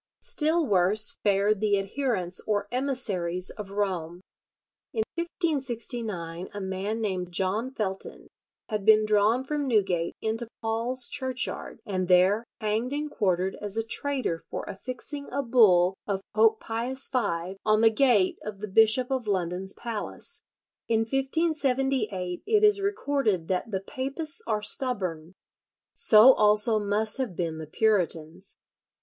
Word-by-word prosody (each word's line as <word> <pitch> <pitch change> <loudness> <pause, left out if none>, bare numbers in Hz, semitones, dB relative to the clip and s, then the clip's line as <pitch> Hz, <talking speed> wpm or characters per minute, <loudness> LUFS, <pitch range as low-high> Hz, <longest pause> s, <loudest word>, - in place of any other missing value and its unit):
Still 320 +2 +1
worse 205 0 +4
fared 205 0 +2
the 205 -2 +2
adherents 195 -3 -2
or 205 -1 0
emissaries 200 -10 -1
of 210 -2 -8
Rome. 180 -4 -3 0.7
In 440 - 0
1569 235 - -2
a 205 - -7
man 195 +3 -3
named 185 -4 -3
John 195 +7 -1
Felton 195 -7 -5 0.4
had 210 -3 -3
been 215 +1 +5
drawn 215 +4 +2
from 290 +1 -2
Newgate 190 -8 0
into 225 +2 -3 0.2
Paul's 235 +3 +1
Churchyard, 260 -3 -4
and 185 -3 -2
there 185 +4 +4 0.2
hanged 220 +4 -1
and 300 +1 -3
quartered 185 -3 0
as 205 0 -2
a 225 - +1
traitor 250 -6 -2
for - - -5
affixing 255 +7 -6
a 280 +2 -1
bull 200 -8 +4
of 195 -2 -2
Pope 220 0 +4
Pius 245 +4 -2
V 190 -7 -2
on 215 0 +3
the 225 0 +5
gate 220 -6 +2
of 210 -1 -7
the 210 +2 -6
Bishop 225 +5 +3
of 255 -4 -2
London's 185 0 -2
palace. 230 -3 -6 0.5
In 225 -1 +2
1578 265 - -1
it 430 -1 +3
is 415 -1 +5
recorded 275 - -1
that 185 +4 -1
"the 190 -3 -3
papists 290 - -5
are 210 -1 -1
stubborn." 185 - -2 0.6
So 225 +4 +8
also 215 +1 +5
must 215 +4 +1
have 240 -9 -3
been 165 -2 -3
the 155 - -7
Puritans. 180 -3 -1
215 Hz, 135 wpm, -26 LUFS, 190-255 Hz, 0.7 s, So